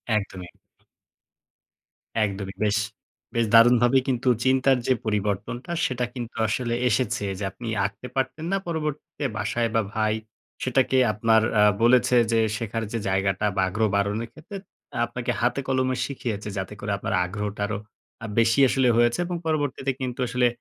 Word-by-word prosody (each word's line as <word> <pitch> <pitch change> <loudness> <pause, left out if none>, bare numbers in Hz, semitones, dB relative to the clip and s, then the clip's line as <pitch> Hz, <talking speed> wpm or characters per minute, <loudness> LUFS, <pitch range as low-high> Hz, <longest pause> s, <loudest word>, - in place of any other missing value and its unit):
একদমই। 95 -3 -3 1.8
একদমই 100 -1 -3
বেশ, 105 -1 +2 0.6
বেশ 115 -1 +2
দারুণভাবে 120 +2 +6
কিন্তু 130 0 -1 0.2
চিন্তার 130 0 +3
যে 130 - +5
পরিবর্তনটা 105 - -2
সেটা 125 -1 -1
কিন্তু 120 -2 -6
আসলে 115 +2 -1 0.2
এসেছে 115 -2 0
যে - - -4
আপনি 120 - -9 0.2
আঁকতে 100 +5 -5
পারতেন 155 +4 -2
না 195 - +2
পরবর্তীতে 150 -3 -4
বাসায় 115 +3 0
বা 115 - +4
ভাই। 110 -1 +1 0.5
সেটাকে 130 +1 +2 0.2
আপনার 110 +2 +3 0.2
আ - - +6 0.2
বলেছে 125 +1 +5 0.2
যে 115 - +3 0.2
শেখার 115 0 -3
যে 115 - -1
জায়গাটা 95 +1 0
বা 95 - +2
আগ্রহ 110 +3 +1
বারণের 105 +3 0
ক্ষেত্রে 160 +6 -9 0.5
আপনাকে 120 +1 -3
হাতে 125 +3 +1
কলমে 130 -1 +1
শিখিয়েছে 115 -7 -4
যাতে 95 +2 -4
করে 105 - -3
আপনার 110 +3 -3
আগ্রহটা 105 +2 -4
আরো 110 +1 -2 0.6
বেশি 115 +3 +3
আসলে 130 0 +2
হয়েছে 120 +3 +3
এবং 175 0 -3
পরবর্তীতে 145 -3 0
কিন্তু 125 -1 -4
আসলে 125 +1 +2
115 Hz, 145 wpm, -25 LUFS, 105-130 Hz, 1.8 s, দারুণভাবে